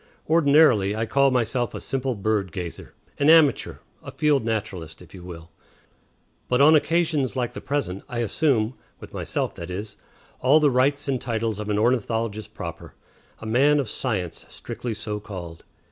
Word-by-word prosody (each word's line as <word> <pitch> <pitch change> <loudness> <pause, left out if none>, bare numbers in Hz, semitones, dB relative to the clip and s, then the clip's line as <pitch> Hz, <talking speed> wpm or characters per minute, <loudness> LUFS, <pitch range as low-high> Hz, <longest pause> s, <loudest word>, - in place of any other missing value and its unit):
Ordinarily 145 -10 +4
I 110 +1 -1
call 140 +4 +3
myself 120 -1 0
a - - -4
simple 135 -2 -2
bird 100 -2 -1
gazer, 90 -1 -7 0.2
an 145 +1 +4
amateur, 160 -3 +5 0.3
a - - -9
field 150 -4 +1
naturalist, 100 -7 -4
if 90 - -15
you 95 - -10
will; 85 -2 -10 1.0
but 125 - +1
on 150 +3 +7
occasions 155 -4 +1
like 125 -2 -2
the - - -7
present 140 -10 -2
I 120 - -5
assume 120 0 +1 0.3
with - - -12
myself, - - -2
that 85 +1 -8
is 100 +3 -6 0.4
all 135 +5 +5
the 150 -2 +3
rights 140 +3 +1
and 130 -3 -1
titles 115 -3 -2
of 105 0 -5
an 105 - +1
ornithologist 115 -2 -1
proper, - - -8 0.4
a - - -11
man 140 +7 +3
of 135 - -1
science 95 -12 -3
strictly 120 -1 -6
so 105 -1 -4
called. 90 -5 -9
115 Hz, 165 wpm, -24 LUFS, 105-140 Hz, 1.0 s, on